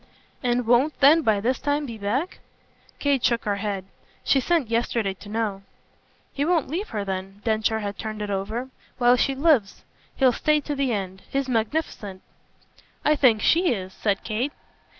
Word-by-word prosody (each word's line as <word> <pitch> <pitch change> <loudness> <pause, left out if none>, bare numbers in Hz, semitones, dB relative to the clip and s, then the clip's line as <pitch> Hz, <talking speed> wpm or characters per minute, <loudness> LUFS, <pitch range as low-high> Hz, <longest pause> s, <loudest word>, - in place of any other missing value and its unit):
"And 245 -1 0
won't 245 +6 +3
then 295 +4 +7
by 220 -7 +2
this 250 +5 0
time 290 0 0
be 230 -4 -7
back?" 245 - -2 0.6
Kate 280 -3 +1
shook 235 -1 +1
her 205 -1 0
head. 200 -2 -3 0.4
"She 275 - +3
sent 290 -4 0
yesterday 230 -3 0
to 205 +2 -13
know." 210 -3 -2 0.7
"He 280 - -1
won't 330 -2 +1
leave 355 +9 -3
her 210 -2 -3
then" 195 +1 -5
Densher 220 0 +1
had 200 -1 -5
turned 215 -1 -4
it 205 - -4
over 215 +6 -3 0.3
"while 245 0 +5
she 270 +2 +1
lives. 270 -8 +2 0.3
He'll 260 -2 +4
stay 305 +5 +2
to 290 - -4
the 275 -3 0
end. 190 -3 -3
He's 275 -1 -1
magnificent." 225 -5 -2 0.8
"I 300 - +4
think 240 -7 +4
SHE 340 -5 +3
is," 190 -1 -7
said 200 -2 -1
Kate. 240 +7 -2
235 Hz, 170 wpm, -24 LUFS, 205-280 Hz, 0.8 s, then